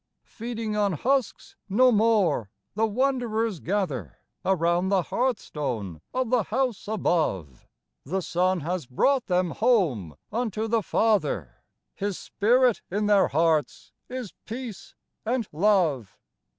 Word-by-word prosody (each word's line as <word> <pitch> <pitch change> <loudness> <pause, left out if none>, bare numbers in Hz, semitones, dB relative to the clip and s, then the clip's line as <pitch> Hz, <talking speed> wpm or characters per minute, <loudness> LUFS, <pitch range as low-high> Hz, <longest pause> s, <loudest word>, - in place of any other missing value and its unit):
Feeding 230 -2 -5
on 205 -2 +1
husks 265 - -1
no 250 +6 +5
more, 205 - +2 0.2
the 225 +2 +1
wanderers 230 - 0
gather 150 - -2 0.3
Around 175 0 +1
the 195 -2 +2
hearthstone 140 - -2
of 255 -2 -1
the 250 -2 +4
House 250 -3 -1
above: 175 - 0
12 - - -22
EASTER 60 - -26
GLEAMS - - -36 0.4
The 190 0 0
Son 180 +2 +1
has 175 +1 -3
brought 260 - +1
them 180 -2 +1
home 160 - +1 0.2
unto 220 -1 -2
the 225 0 +2
Father; 155 - 0 0.3
His 200 -2 -3
Spirit 245 +3 +2
in 210 +3 -1
their 205 -2 +4
hearts 155 -2 0 0.2
is 250 -5 -6
peace 230 -3 -7 0.3
and 235 -1 -1
love. 160 - +1
205 Hz, 130 wpm, -26 LUFS, 165-230 Hz, 0.4 s, no